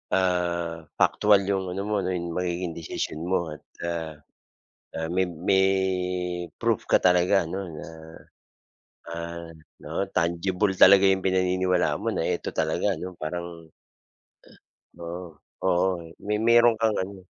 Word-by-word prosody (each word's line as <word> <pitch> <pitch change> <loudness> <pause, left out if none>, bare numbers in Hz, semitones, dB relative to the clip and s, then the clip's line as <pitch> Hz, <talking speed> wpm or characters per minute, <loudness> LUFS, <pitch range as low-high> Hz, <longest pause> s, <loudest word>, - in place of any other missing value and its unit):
Ah, 85 -3 0 0.2
paktual 105 -1 +4
'yung 95 -2 -1
ano 95 +2 -3
mo, 105 -2 0
'yung 85 -2 -3
magiging 90 -1 -2
desisyon 80 -1 -4
mo 85 -2 +1
at 75 - -17 0.2
a 85 - -3 1.1
a 80 - -2
may 95 0 +1
may 90 +3 +1 1.0
proof - - -1
ka - - +5
talaga 90 +1 +3
'no, 95 +3 -5
na, 75 -3 -8 1.2
ah, 85 0 -6 0.3
'no, - - -2
tangible 95 +3 0
talaga 100 +1 +7
'yung 95 -1 +1
pinaniniwalaan 95 -1 +1
mo - - 0
na - - -2
eto - - -2
talaga 80 +5 0
'no 90 0 -7
parang 85 0 -6 1.3
Oo, 85 -1 -7 0.2
oo. 95 0 +2 0.2
May 105 +1 -2
meron 120 0 +6
kang 110 -2 +2
ano 95 0 -10
90 Hz, 130 wpm, -26 LUFS, 85-95 Hz, 1.3 s, talaga